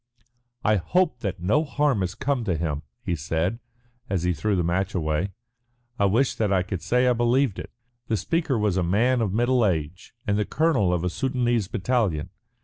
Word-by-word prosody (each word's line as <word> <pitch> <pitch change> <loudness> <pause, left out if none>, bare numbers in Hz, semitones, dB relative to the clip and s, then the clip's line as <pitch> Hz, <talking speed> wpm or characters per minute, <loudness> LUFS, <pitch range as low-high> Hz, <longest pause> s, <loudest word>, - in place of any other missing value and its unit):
"I 105 -1 +3
hope 165 - +1
that 100 -7 -3
no 125 - +3
harm 145 -6 +1
has 90 -1 -2
come 135 -3 -1
to 90 -6 0
him," 75 -3 -2 0.2
he 85 - -1
said, 80 +7 -1 0.5
as 95 -3 -1
he 90 0 +2
threw 100 +6 0
the 90 - +1
match 95 +4 -1
away. 80 +2 0 0.7
"I 100 - +4
wish 115 +7 +2
that 105 -3 -1
I 95 -2 +3
could 95 -2 -4
say 125 +1 +2
I 125 - +4
believed 120 -1 +1
it." - - -7 0.4
The 110 - +1
speaker 160 - 0
was 105 -4 +1
a 95 - +2
man 115 +8 +2
of 105 -4 0
middle 120 +3 +2
age 85 0 -2
and 100 0 +1
the 105 - +1
colonel 155 - +2
of 90 -1 0
a 90 - +1
Soudanese 120 -3 0
battalion. 100 - -1
105 Hz, 195 wpm, -25 LUFS, 90-125 Hz, 0.7 s, I